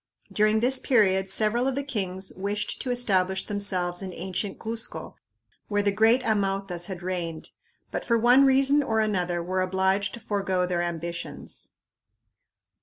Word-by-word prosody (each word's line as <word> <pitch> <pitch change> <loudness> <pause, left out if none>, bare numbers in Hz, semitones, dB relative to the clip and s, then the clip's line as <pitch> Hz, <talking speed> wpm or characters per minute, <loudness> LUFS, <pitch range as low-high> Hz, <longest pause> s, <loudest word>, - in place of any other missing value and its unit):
During 215 +1 +3
this 255 +2 +4
period 190 -6 +2
several 220 +5 +2
of 270 - -1
the 280 - -1
kings 190 -8 -2
wished 200 +2 -3
to 260 - -4
establish 190 -6 +1
themselves 185 -3 -1
in 190 -1 -5
ancient 190 +3 -4
Cuzco, 225 +1 -4 0.5
where 205 -1 0
the 200 - +2
great 225 +5 +3
Amautas 195 -5 -1
had 185 -2 -7
reigned, 170 -3 -4 0.4
but - - -3
for 235 - +2
one 245 +4 +5
reason 275 +2 +4
or 225 -5 0
another 180 -5 0
were 185 +2 -1
obliged 190 +2 0
to - - -10
forego 195 -4 -1
their 175 -1 -1
ambitions. 170 0 -5
200 Hz, 150 wpm, -26 LUFS, 185-225 Hz, 0.5 s, one